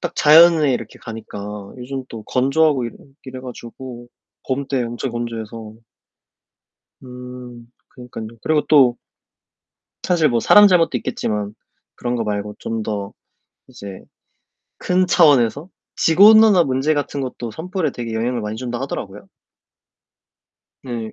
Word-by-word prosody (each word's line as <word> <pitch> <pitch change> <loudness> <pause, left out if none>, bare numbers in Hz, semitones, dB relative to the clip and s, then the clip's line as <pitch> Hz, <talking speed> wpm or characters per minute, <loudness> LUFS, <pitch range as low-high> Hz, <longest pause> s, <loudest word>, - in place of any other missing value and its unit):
딱 175 - -4
자연에 155 -2 +6
이렇게 115 -3 -5
가니까 105 -3 -8
요즘 130 +1 -6
또 115 -2 -9
건조하고 135 +1 +1
이러 115 - -6 0.3
이래 130 -1 -8
가지고 120 0 -10 0.4
봄 135 +1 -2
때 135 -2 -1
엄청 120 +2 -4
건조해서. 115 -2 -6 1.3
음 125 -1 -11 0.2
그러니깐요. 115 -2 -10
그리고 155 -1 +1
또 130 -5 +5 1.1
사실 165 -4 +2
뭐 120 -3 0
사람 210 - +7
잘못도 170 -7 +2
있겠지만 105 -2 -3 0.4
그런 120 0 -3
거 115 - -2
말고 105 0 -4
좀 115 -1 -4
더 100 -2 -4 0.6
이제 100 -2 -10 0.8
큰 185 0 +1
차원에서 145 -3 +3 0.3
지구온난화 205 +2 +6
문제 135 +3 0
같은 145 -1 -3
것도 125 -3 -5
산불에 170 - -3
되게 115 -2 -6
영향을 120 +2 -1
많이 105 +1 -5
준다 120 0 -5
하더라고요. 105 -7 -6 1.6
네. 115 -4 -6
125 Hz, 275 characters per minute, -19 LUFS, 115-145 Hz, 1.6 s, 사람